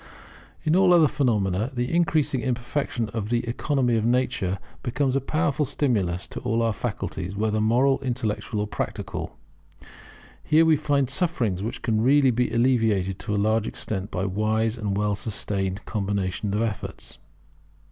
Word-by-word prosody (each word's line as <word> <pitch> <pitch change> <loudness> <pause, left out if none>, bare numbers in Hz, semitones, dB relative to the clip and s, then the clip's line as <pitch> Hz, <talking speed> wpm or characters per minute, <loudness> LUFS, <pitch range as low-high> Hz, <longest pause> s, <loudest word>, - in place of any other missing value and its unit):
In 155 +1 +2
all 185 -1 +5
other 165 -3 +6
phenomena, 110 -6 0
the 120 +5 -1
increasing 155 -5 +2
imperfection 125 -1 -2
of 105 -1 -4
the 120 0 0
economy 125 0 +1
of 110 - 0
nature 115 -6 +1 0.2
becomes 130 +1 0
a 135 - +2
powerful 150 +1 0
stimulus 105 - 0
to - - -5
all 115 -1 0
our 115 -1 +1
faculties, 95 -1 -4
whether 110 +1 0
moral, 125 +5 +3
intellectual 115 -4 -2
or - - 0
practical. 105 - -5 1.1
Here 160 +1 +4
we 160 -1 +5
find 145 -2 +1
sufferings 130 - 0
which 110 +3 -5
can 110 -2 +1
really 135 +2 +5
be 125 +1 +1
alleviated 110 -6 +2
to 105 - -2
a - - 0
large 110 +2 +1
extent 100 -1 -3
by 90 - -2
wise 110 +3 0
and 105 -4 -2
well 105 0 +1
sustained 100 -2 -3
combination 100 -1 -2
of 110 - +1
efforts. 105 -7 -5
115 Hz, 155 wpm, -25 LUFS, 105-135 Hz, 1.1 s, other